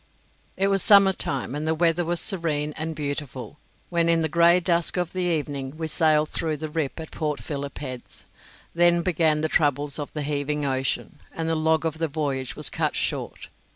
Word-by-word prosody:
It 195 +1 +2
was 195 -1 +2
summer 200 -1 +6
time, 135 -7 -2
and 150 +2 -3
the 160 - +1
weather 170 +1 +2
was 170 +1 0
serene 155 -6 -1
and 160 +1 -4
beautiful, 145 -1 -5 0.3
when 170 -1 +2
in 165 -1 +3
the - - +1
grey 170 +2 +5
dusk 170 -1 0
of 175 -2 -1
the 185 - -2
evening 145 -4 -2
we 160 - -3
sailed 155 -1 +3
through 155 -2 -1
the 155 +1 -5
Rip 155 -1 -3
at 160 - -8
Port 150 -2 -2
Philip 140 -2 -5
Heads. 130 -4 -7 0.5
Then 175 0 +4
began 160 -3 +2
the 160 - +1
troubles 145 -1 +1
of 145 - -5
the 150 - -3
heaving 145 0 -1
ocean, 135 +2 -2
and 165 0 -4
the 165 - +1
log 160 0 +1
of 160 -1 -2
the 165 - +1
voyage 140 -4 -3
was - - -1
cut - - -1
short. - - -3
155 Hz, 195 wpm, -25 LUFS, 145-170 Hz, 0.5 s, summer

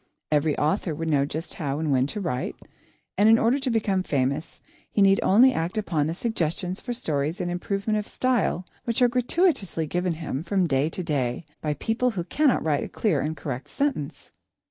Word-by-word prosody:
Every 150 0 +2
author 155 +1 0
would 165 +1 -3
know 140 -1 +2
just 160 +3 -5
how 140 -2 -3
and 155 -1 -1
when 130 0 +3
to 210 - -5
write, 165 -10 -2 0.6
and 210 +2 +6
in 225 - +7
order 235 +5 +2
to 265 -1 -1
become 210 -5 +1
famous, 140 -2 -1 0.3
he - - -2
need 195 -1 +5
only 245 +7 +6
act 170 +2 -2
upon 160 -8 0
the 165 - -2
suggestions 180 -3 -2
for 245 - -5
stories 155 - -2
and 175 -1 -2
improvement 200 +4 -1
of 210 - -6
style 240 -8 0 0.2
which 235 +1 +1
are - - +7
gratuitously 245 - +1
given 180 +3 -1
him 155 -4 -4
from 190 +1 +1
day 140 -1 +1
to 180 - -4
day, 140 -2 -1 0.2
by 150 -1 -1
people 225 - 0
who 195 -7 -3
cannot 275 - +2
write 150 -3 +1
a - - -6
clear 180 -11 0
and 155 +2 -3
correct 130 -3 -5
sentence. 275 - -3
175 Hz, 195 wpm, -25 LUFS, 150-220 Hz, 0.6 s, in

